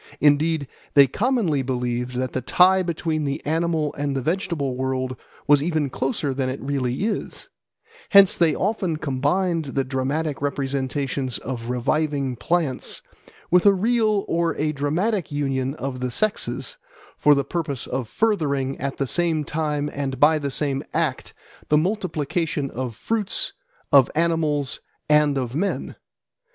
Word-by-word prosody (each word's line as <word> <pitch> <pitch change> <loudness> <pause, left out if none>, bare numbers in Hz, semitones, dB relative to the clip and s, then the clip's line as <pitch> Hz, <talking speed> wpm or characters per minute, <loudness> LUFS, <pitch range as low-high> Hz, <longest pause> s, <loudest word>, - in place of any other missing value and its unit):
Indeed 150 0 +3 0.3
they 140 -1 +9
commonly 200 - +1
believed 125 -1 -2
that 130 0 -2
the 130 - -1
tie 185 +9 +4
between 165 -3 -2
the 140 -1 -2
animal 160 -1 0
and 145 -1 -2
the 135 - -1
vegetable 165 -6 -1
world 130 0 -2 0.3
was 145 -1 +5
even 155 -3 0
closer 135 +1 -1
than 130 -1 -1
it 130 - -4
really 135 +1 -2
is; 215 0 -3 0.6
hence 200 -2 +7
they 165 -3 +3
often 190 -5 -1
combined 155 +5 0
the 135 0 -1
dramatic 135 +3 -2
representation 135 -1 -2
of 120 -2 -5
reviving 140 +1 0
plants 155 0 -1 0.5
with 180 0 +5
a 200 - +8
real 215 0 +2
or 170 -1 0
a 150 +1 0
dramatic 160 +7 -1
union 135 -2 -1
of 135 -3 -4
the 125 0 -2
sexes 215 - -1 0.4
for 150 -1 +5
the 140 -1 0
purpose 145 -5 -3
of 130 -2 -3
furthering 140 - 0
at 140 0 -3
the 135 - 0
same 165 +2 0
time 150 -1 -1
and 135 -2 -3
by 155 +2 +5
the 140 -1 -2
same 140 0 -1
act - - -1 0.4
the 150 - +5
multiplication 160 -5 -1
of 125 -2 -4
fruits, 215 - -1 0.4
of 135 -3 +6
animals, 155 -4 0 0.3
and 150 -2 +4
of 125 -2 -2
men. 190 +8 -2
145 Hz, 145 wpm, -23 LUFS, 135-165 Hz, 0.6 s, they